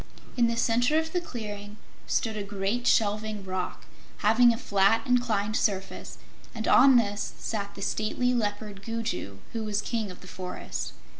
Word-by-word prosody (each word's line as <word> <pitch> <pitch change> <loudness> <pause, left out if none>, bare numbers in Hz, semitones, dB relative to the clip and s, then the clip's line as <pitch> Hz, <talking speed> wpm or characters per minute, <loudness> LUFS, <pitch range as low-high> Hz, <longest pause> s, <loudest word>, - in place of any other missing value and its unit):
In 240 -2 +4
the 230 0 -1
center 245 +6 +3
of 320 +1 -1
the 355 - +1
clearing 210 -7 -7 0.3
stood 225 -3 0
a 210 - -3
great 200 +4 -2
shelving 210 -1 +1
rock, 185 -1 -4 0.4
having 235 +3 +6
a 230 - -2
flat, 200 -1 +2
inclined 225 -5 +1
surface, 195 -3 -1 0.4
and 220 -1 -3
on 270 0 +7
this 205 -3 +1
sat 200 -2 -4
the - - -6
stately 235 +5 0
Leopard 205 -3 -2
Gugu, 225 - -3 0.2
who 225 -1 -2
was 210 -1 -1
King 220 -1 -2
of 180 - -11
the 180 - -12
Forest. 180 +2 -5
215 Hz, 160 wpm, -28 LUFS, 200-235 Hz, 0.4 s, on